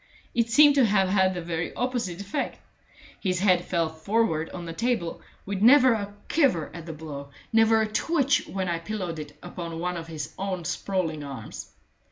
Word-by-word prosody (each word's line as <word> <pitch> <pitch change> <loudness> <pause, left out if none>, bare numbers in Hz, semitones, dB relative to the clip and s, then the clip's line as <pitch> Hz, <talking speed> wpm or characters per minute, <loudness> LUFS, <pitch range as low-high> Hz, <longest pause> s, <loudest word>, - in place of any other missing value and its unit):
It 235 -1 +1
seemed 290 +4 +7
to 275 -3 +5
have 195 -3 +3
had 190 -1 +3
the 175 - -4
very 165 -1 -3
opposite 240 -8 -2
effect. 200 0 -3 0.6
His 185 -3 0
head 185 -3 +4
fell 170 -2 0
forward 160 0 0
on 175 -1 -7
the 165 - -5
table, 220 -4 -1 0.2
with 195 0 -3
never 255 +2 +7
a 205 -2 -3 0.2
quiver 255 - +2
at 170 0 -9
the - - -4
blow, 145 -2 -8 0.2
never 225 0 +5
a - - -1
twitch 285 +5 +1
when 190 -1 -3
I 170 -1 -1
pillowed 180 -3 -4
it 150 -1 -9
upon 170 -2 -6
one 180 +1 -2
of 165 -1 -7
his 155 -3 -6
own 190 -3 -3
sprawling 165 -5 -2
arms. 135 -6 -8
185 Hz, 185 wpm, -26 LUFS, 165-225 Hz, 0.6 s, seemed